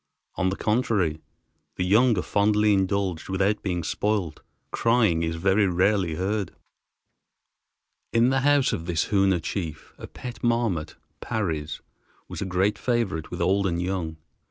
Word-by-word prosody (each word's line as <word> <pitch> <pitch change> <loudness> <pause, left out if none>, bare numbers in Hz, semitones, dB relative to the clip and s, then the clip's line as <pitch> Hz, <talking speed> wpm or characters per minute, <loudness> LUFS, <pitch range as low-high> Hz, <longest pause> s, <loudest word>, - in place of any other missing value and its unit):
On 95 - 0
the 95 - -2
contrary 105 -9 0 0.5
the 90 - -1
young 110 +4 +4
are 90 - 0
fondly 105 +1 +2
indulged 95 -3 -1
without 100 +2 +1
being 90 -3 -2
spoiled. 100 -3 -1 0.3
Crying 115 -8 +2
is 80 0 -1
very 95 +4 +2
rarely 90 -1 +1
heard. 100 +3 -2 1.6
In 115 +2 +4
the 135 - +2
house 145 0 +3
of 80 - -4
this 85 -3 -1
Hoona 95 -3 +3
chief 85 -2 -5
a - - -8
pet 125 -1 -9
marmot 115 -9 0 0.2
(Parry's) 80 -8 -3 0.5
was - - -7
a - - -1
great 95 +2 0
favorite 115 -8 -1
with - - -5
old 100 +1 +2
and 85 -2 -1
young. 90 -3 -3
95 Hz, 145 wpm, -25 LUFS, 85-105 Hz, 1.6 s, young